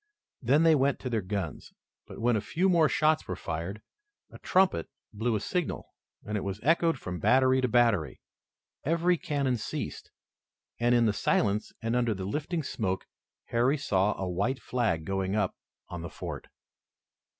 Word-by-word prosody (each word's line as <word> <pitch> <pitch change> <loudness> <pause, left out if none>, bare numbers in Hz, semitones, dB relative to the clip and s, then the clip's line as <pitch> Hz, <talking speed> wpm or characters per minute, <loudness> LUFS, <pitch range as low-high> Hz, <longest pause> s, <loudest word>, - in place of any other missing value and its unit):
Then 140 +6 +3
they 165 -1 +6
went 140 -1 +2
to 125 - -4
their 115 -2 +1
guns, 95 -5 -5 0.3
but, - - -10
when 120 +1 +2
a 105 - 0
few 170 - +1
more 165 -4 +4
shots 155 0 +2
were 90 - -3
fired, 85 +7 -5 0.5
a - - -12
trumpet 185 - +2 0.2
blew 110 +2 0
a - - 0
signal, 175 - -3 0.4
and 105 - -3
it 105 - -1
was 100 +1 -4
echoed 165 +1 +3
from 90 -6 -6
battery 130 +5 +4
to 125 - +2
battery. 115 -9 +2 0.6
Every 170 +4 +2
cannon 140 -6 -1
ceased, 110 - -5 0.7
and, 120 +1 +3
in 120 -1 +4
the 110 - +2
silence 105 0 +1
and 115 +1 0
under 120 -3 +1
the 95 -1 -5
lifting 155 - -2
smoke, 95 -7 -2 0.4
Harry 125 +5 +2
saw 105 -8 +1
a 95 - -2
white 100 +9 -1
flag 110 -11 -1
going 95 +1 -1
up 105 -4 0 0.3
on 90 -1 -6
the 85 - -6
fort. - - -7
120 Hz, 170 wpm, -29 LUFS, 100-140 Hz, 0.7 s, they